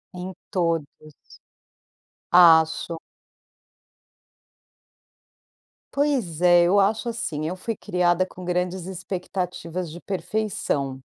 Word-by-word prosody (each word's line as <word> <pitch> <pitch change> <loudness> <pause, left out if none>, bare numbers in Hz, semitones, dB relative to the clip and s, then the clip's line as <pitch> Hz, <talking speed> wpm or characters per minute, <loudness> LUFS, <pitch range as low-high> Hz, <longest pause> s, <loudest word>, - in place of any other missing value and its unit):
Em 180 +1 -6 0.2
todos. 165 -4 +1 1.5
Acho. 165 -1 +5 3.0
Pois 260 - 0
é, 175 -1 +6
eu 185 +4 +4
acho 215 +4 +1
assim, 155 -10 -3
eu 180 - -3
fui 225 +5 -4
criada 180 -2 +1
com 185 0 -12
grandes 180 0 -2
expectativas 180 -2 -4
de 175 +2 -10
perfeição. 180 -8 -2
180 Hz, 85 wpm, -24 LUFS, 170-190 Hz, 3.0 s, é